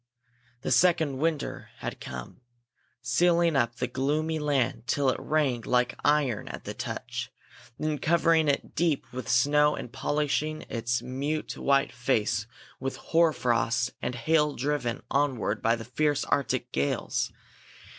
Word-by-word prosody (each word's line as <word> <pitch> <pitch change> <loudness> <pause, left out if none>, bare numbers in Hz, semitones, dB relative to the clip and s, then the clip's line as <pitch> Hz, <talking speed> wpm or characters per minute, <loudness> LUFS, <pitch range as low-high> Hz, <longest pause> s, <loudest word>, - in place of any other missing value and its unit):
The - - -2
second 160 -6 +3
winter 160 -1 -2
had - - -5
come, 65 - -8 0.6
sealing 170 +5 +3
up 120 -3 +1
the - - -1
gloomy 155 +4 -1
land 140 -5 0
till 140 -2 +2
it - - -4
rang 145 -6 +1
like 125 +1 +1
iron 145 -7 +2
at - - -7
the - - -5
touch, - - -5 0.5
then 155 0 -1
covering 165 -1 +3
it 140 -1 0
deep 165 -5 +1
with 130 0 -5
snow 150 +5 +4
and 120 - -7
polishing 150 +1 -1
its 120 0 -1
mute 140 +5 -3
white 140 0 +2
face 110 -3 0 0.3
with 135 0 -3
hoar 165 0 +3
frost 120 -1 +1
and 125 - -2
hail 150 +4 +2
driven 135 -3 -2
onward 130 -7 0
by 115 +1 +3
the 115 -1 -8
fierce 145 +3 0
Arctic 140 - 0
gales. 70 +1 -1
140 Hz, 140 wpm, -28 LUFS, 120-155 Hz, 0.6 s, snow